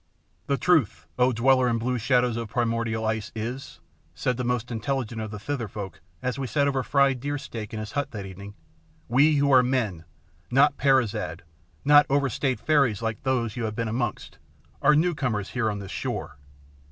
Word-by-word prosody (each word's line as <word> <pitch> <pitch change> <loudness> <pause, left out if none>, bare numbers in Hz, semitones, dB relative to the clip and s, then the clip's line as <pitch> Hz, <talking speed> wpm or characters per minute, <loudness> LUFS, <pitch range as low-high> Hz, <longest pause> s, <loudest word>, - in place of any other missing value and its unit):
"The 140 - +1
truth, 160 - +2
O 125 +1 +4
dweller 130 +2 +3
in 115 - +1
blue 125 +2 -1
shadows 125 0 +2
of 115 -2 -4
primordial 115 -1 -1
ice, 110 -1 -2
is," 115 - -5 0.4
said 80 - 0
the 125 - -3
most 125 0 -1
intelligent 120 -1 -2
of 110 - -4
the 105 - -6
Thither 120 +2 -3
folk 95 -4 -7 0.2
as 125 +1 -2
we 135 - -2
sat 140 +5 +1
over 135 -2 +1
fried 140 0 +2
deer 145 +3 -2
steak 110 -6 -7
in 110 - -5
his 105 -1 -6
hut 145 0 -2
that 100 -3 -6
evening, 100 +2 -10 0.5
"we 145 +6 +4
who 140 0 +2
are 130 - +8
MEN, 115 -10 -1 0.4
not 140 +3 +4
Peri 135 -3 +4
zad, 105 - -5 0.4
not 145 0 +7
overstayed 135 -1 0
fairies 135 -8 +2
like 115 -1 -2
those 120 -5 -1
you 120 - -2
have 110 -1 -3
been 115 +1 -2
amongst, 110 - -3 0.4
are 150 - +5
newcomers 135 - 0
here 125 -3 0
on 105 - -3
this 100 -1 -8
shore. - - -4
120 Hz, 190 wpm, -26 LUFS, 110-135 Hz, 0.5 s, are